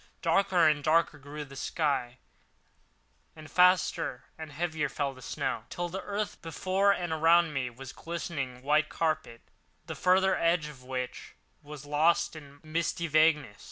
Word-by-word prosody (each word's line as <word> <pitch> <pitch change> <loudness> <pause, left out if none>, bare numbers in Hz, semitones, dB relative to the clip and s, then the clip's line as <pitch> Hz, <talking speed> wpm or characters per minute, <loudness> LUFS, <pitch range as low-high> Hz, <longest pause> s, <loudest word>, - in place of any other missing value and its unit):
Darker 170 0 +3
and 150 -2 +2
darker 155 -1 +2
grew 145 +2 -7
the 140 0 -13
sky, 135 -5 -1 1.2
and 155 -2 -12
faster 180 -8 +3
and 160 -1 -9
heavier 160 -1 -2
fell 140 -2 -2
the 130 - -15
snow, 115 - -3
till 175 0 -4
the 190 +3 -5
earth 205 +1 -4
before 185 +4 +1
and 175 -4 -1
around 165 0 +4
me 130 -3 -2
was 130 +2 -10
a - - -19
glistening 140 -7 -5
white 150 +2 +2
carpet 155 -8 -2 0.4
the - - -5
further 190 +1 +3
edge 165 -2 +1
of 135 -4 -13
which 125 -1 -6 0.3
was 145 -1 -10
lost 155 +4 +2
in 145 -2 -12
misty 165 +1 -2
vagueness. 155 -8 +2
155 Hz, 155 wpm, -29 LUFS, 140-170 Hz, 1.2 s, around